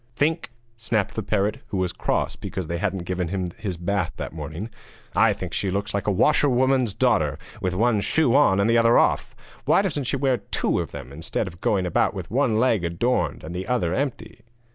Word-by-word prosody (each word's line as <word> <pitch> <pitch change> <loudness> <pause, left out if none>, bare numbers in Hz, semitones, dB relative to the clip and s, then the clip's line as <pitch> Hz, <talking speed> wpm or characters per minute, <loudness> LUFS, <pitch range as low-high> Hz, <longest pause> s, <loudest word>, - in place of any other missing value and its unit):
'Think?' 160 +5 0 0.3
snapped 110 -3 -1
the 110 - -2
parrot, 105 0 0
who 105 -3 -3
was 90 -1 -1
cross - - -1
because 95 - -5
they 85 +2 -3
hadn't 95 -2 -2
given 90 -1 -2
him 90 0 -2
his 95 -6 -4
bath 90 -1 -1
that - - -5
morning, 80 +8 -6 0.4
'I - - +5
think - - -7
she 100 - -1
looks 100 +2 -2
like 100 +1 -2
a - - +3
washerwoman's 130 -1 +3
daughter, - - +2 0.2
with 90 -1 -1
one 110 +1 +2
shoe 145 +2 +2
on 135 -9 +5
and 100 - +3
the 115 0 +4
other 115 +1 +5
off! - - +2 0.3
Why 195 - +4
doesn't 150 -8 -2
she 135 - 0
wear 135 -2 +2
two 100 - -1
of - - -3
them, 65 - -9
instead 80 +8 -3
of 85 -3 -10
going 95 -3 +1
about 90 - +1
with - - -6
one 120 -3 +2
leg 115 -6 +2
adorned 85 +10 0
and 80 +2 -7
the 90 +1 -4
other 115 -9 0
empty?' 135 +3 -3
100 Hz, 210 wpm, -24 LUFS, 90-125 Hz, 0.4 s, I